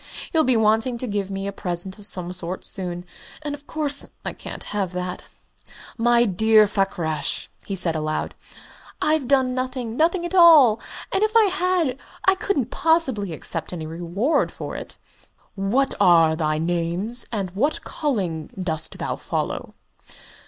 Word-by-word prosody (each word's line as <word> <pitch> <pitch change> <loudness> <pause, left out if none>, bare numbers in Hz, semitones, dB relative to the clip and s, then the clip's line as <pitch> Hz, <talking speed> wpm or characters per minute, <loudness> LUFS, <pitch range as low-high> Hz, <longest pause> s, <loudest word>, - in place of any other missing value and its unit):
He'll 320 -1 +3
be 255 -4 +3
wanting 225 +3 +2
to 255 - -4
give 205 -4 -2
me 195 0 -4
a 200 - -2
present 185 +1 -2
of 205 - -2
some 180 -3 -1
sort 185 0 -4
soon 180 -2 -2 0.4
and 295 -1 -3
of 290 0 -10
course 295 -3 -1 0.2
I - - -2
can't - - -8
have 195 -3 -3
that.... 180 0 -4 0.7
My 240 +1 +4
dear 215 +2 +5
Mr. - - -5
Fakrash," 175 -7 -1 0.2
he 195 - -2
said 175 -3 +2
aloud, 155 0 -2 0.7
"I've 305 -4 +1
done 260 -2 +3
nothing 255 -3 -3
nothing 340 +4 +2
at 345 - -5
all 310 - +7 0.3
and 385 - +1
if 435 +1 +3
I 445 - +7
had, 360 -8 +1 0.3
I 380 - +6
couldn't 375 - -1
possibly 270 - +1
accept 160 0 -1
any 165 -3 -5
reward 175 - 0
for - - -7
it." - - -8 0.6
"What 225 +8 +1
are 165 -5 +5
thy 155 -1 0
names, 175 +8 -2
and 195 -5 -3
what 260 +12 0
calling 185 - -2
dost 160 -4 0
thou - - -3
follow?" - - -4
210 Hz, 160 wpm, -23 LUFS, 180-275 Hz, 0.7 s, all